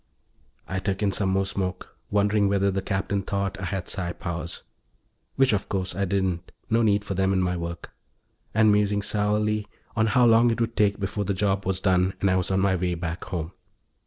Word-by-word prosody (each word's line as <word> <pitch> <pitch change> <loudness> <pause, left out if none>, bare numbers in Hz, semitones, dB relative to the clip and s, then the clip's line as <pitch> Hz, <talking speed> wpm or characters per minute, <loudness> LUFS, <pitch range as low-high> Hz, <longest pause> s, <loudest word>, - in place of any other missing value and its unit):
I 95 - -2
took 95 +1 -2
in 100 - +2
some 95 -1 0
more 95 +1 +1
smoke, 95 -1 -4
wondering 100 0 +2
whether 100 0 +2
the 95 +1 -1
Captain 100 +1 -1
thought 100 0 -2
I - - -3
had 95 0 -3
psi 90 -2 -3
powers 85 -3 -5 0.7
which, 135 -3 +4
of 100 - -1
course, 95 -2 -2
I 100 +1 0
didn't; 95 -2 -1 0.2
no 115 +1 +4
need 105 -2 +2
for 100 - -3
them 95 0 +1
in 95 - +2
my 90 -1 0
work 85 -1 -6 0.6
and 110 0 +4
musing 105 0 +2
sourly 105 0 0 0.3
on 110 -1 +2
how 120 +3 +4
long 115 +1 +6
it 115 - -1
would 115 0 -1
take 100 -1 +2
before 100 +1 -2
the 100 0 -1
job 100 -1 0
was 95 -1 0
done 95 -1 +2
and 95 - +2
I - - +3
was 95 -1 0
on 95 0 +2
my 95 -1 +3
way 90 -1 -1
back 85 0 -4
home. 85 -4 -4
100 Hz, 210 wpm, -25 LUFS, 95-105 Hz, 0.7 s, long